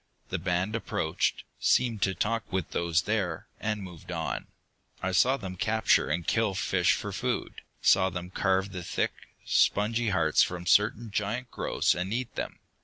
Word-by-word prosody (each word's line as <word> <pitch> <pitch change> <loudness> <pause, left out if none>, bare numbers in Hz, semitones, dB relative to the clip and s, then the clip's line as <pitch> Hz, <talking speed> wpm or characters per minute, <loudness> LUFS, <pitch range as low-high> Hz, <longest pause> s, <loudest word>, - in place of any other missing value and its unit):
The - - -2
band 90 +4 0
approached, 115 - -1 0.2
seemed 120 -4 +2
to 95 -1 +1
talk 115 +5 -1
with 95 -3 -2
those 85 0 +1
there, 100 -6 -1
and 105 -2 -2
moved 90 -4 -10
on. - - -3 0.5
I 95 - -1
saw 125 +9 +4
them 95 -6 -6
capture 110 -1 +2
and 85 +2 -1
kill 110 -4 +1
fish 95 -2 +2
for - - -3
food, - - -3 0.2
saw 95 -1 +5
them 90 0 -6
carve 95 0 +1
the 90 -1 -5
thick, 85 - -1 0.3
spongy 115 +3 +2
hearts 80 -5 +3
from 90 -1 0
certain 105 +4 +3
giant 115 +5 -2
growths - - +1
and 90 +2 -3
eat 125 +1 -2
them. - - -4
95 Hz, 165 wpm, -28 LUFS, 90-110 Hz, 0.5 s, saw